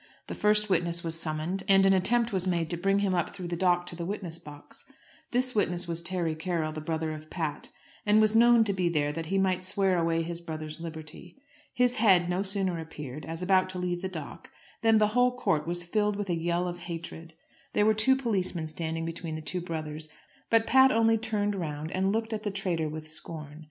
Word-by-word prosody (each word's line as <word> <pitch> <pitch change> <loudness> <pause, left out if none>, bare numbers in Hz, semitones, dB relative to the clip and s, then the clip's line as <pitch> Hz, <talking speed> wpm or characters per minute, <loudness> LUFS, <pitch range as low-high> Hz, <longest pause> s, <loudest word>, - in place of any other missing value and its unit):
The - - -6
first 210 0 +4
witness 170 -2 +2
was 165 -1 0
summoned, 160 +4 -1
and 195 0 +5
an 195 - +5
attempt 230 +5 +3
was 190 -1 +2
made 170 -3 0
to - - 0
bring 195 +3 +1
him 190 - 0
up 175 +1 -1
through 180 -3 -6
the 175 - -2
dock 175 0 +2
into 175 -1 -9
the 170 - -5
witness 175 -3 -5
box. 145 -1 -12 0.5
This 255 +1 +2
witness 180 -4 0
was 170 0 -2
Terry 170 -2 -1
Carroll, 160 -1 -2
the 155 0 -6
brother 160 0 -2
of 155 0 -10
Pat, 160 -5 -4 0.3
and 210 +1 +4
was 215 0 +4
known 235 0 +6
to 205 -2 0
be 180 -2 0
there 150 -3 0
that 165 +1 -5
he 195 - 0
might 185 -1 +1
swear 190 -1 +1
away 165 0 +1
his 170 +1 -5
brother's 155 -1 -7
liberty. 160 - -9 0.3
His 250 0 +2
head 185 -5 +4
no 180 +2 0
sooner 190 -3 -1
appeared, 150 -3 -8
as 165 +2 -4
about 185 0 +3
to 185 - -6
leave 175 -1 -2
the 190 - -3
dock, 160 -6 -8 0.3
than 225 -1 +4
the 210 -1 +3
whole 250 +2 +2
court 160 -11 0
was 175 0 -1
filled 210 +4 0
with 200 -2 -3
a - - +1
yell 170 +2 -1
of 175 0 -5
hatred. 165 -1 -7 0.4
There 210 - +3
were 220 - +5
two 220 +5 +3
policemen 195 -10 -1
standing 160 +1 -4
between 165 -1 -5
the 155 - -5
two 180 +3 -4
brothers, 155 -2 -5 0.4
but 225 0 +3
Pat 265 +1 +6
only 225 0 +3
turned 210 -2 -1
round 155 -4 -4
and 190 +1 0
looked 225 +1 -2
at 215 - -3
the 210 - -2
traitor 180 -6 -2
with 155 0 -7
scorn. 155 -1 -3
175 Hz, 220 wpm, -28 LUFS, 165-205 Hz, 0.5 s, known